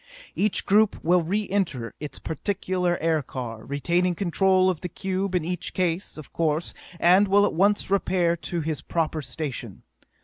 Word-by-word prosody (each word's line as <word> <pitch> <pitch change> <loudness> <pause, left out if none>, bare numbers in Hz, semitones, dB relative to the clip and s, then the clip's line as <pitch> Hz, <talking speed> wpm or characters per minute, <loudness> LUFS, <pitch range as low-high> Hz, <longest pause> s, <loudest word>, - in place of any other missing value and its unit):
Each 210 -1 +1
group 210 +1 +3
will 175 +2 +4
re 200 +6 -1
enter 165 -13 -1
its 150 -1 -7
particular 180 +1 -1
aircar, 130 -8 -2
retaining 170 +7 0
control 185 +1 +3
of 180 -4 0
the 180 - -4
cube 190 +1 -2
in 175 -3 0
each 180 0 -3
case, 180 -1 -1
of 155 - -11
course, 160 0 0 0.3
and 185 +5 +5
will 205 +1 +5
at - - -1
once 200 +3 +2
repair 180 -3 +2
to 170 0 -3
his 155 -2 -3
proper 160 -2 -1
station. 140 -1 -5
175 Hz, 160 wpm, -25 LUFS, 155-190 Hz, 0.3 s, and